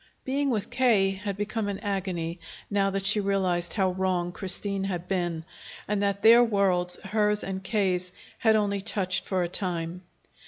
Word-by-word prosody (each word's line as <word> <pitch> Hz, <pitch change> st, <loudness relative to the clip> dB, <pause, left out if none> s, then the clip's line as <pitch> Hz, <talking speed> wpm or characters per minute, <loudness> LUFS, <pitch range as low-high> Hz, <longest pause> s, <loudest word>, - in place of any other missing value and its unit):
Being 275 Hz, +2 st, 0 dB
with 220 Hz, -4 st, -2 dB
K. 235 Hz, -6 st, +3 dB
had 200 Hz, 0 st, -5 dB
become 210 Hz, +1 st, -2 dB
an 200 Hz, -1 st, -3 dB
agony, 185 Hz, -4 st, -3 dB, 0.3 s
now 200 Hz, -1 st, +2 dB
that 195 Hz, 0 st, -2 dB
she 210 Hz, +2 st, +6 dB
realized 190 Hz, -3 st, 0 dB
how 190 Hz, -3 st, +1 dB
wrong 180 Hz, -1 st, -1 dB
Christine 195 Hz, +1 st, 0 dB
had 180 Hz, -2 st, -4 dB
been, 175 Hz, -4 st, -2 dB, 0.4 s
and 210 Hz, -1 st, -1 dB
that 200 Hz, -1 st, -1 dB
their 235 Hz, +2 st, +8 dB
worlds, 190 Hz, -5 st, +1 dB
hers 210 Hz, +1 st, +1 dB
and 190 Hz, 0 st, -5 dB
K.'s, 185 Hz, -3 st, 0 dB, 0.3 s
had 220 Hz, -1 st, +4 dB
only 200 Hz, -2 st, 0 dB
touched 190 Hz, -3 st, 0 dB
for 185 Hz, -2 st, 0 dB
a -, -, -1 dB
time. 175 Hz, -1 st, -3 dB
195 Hz, 165 wpm, -27 LUFS, 180-205 Hz, 0.4 s, their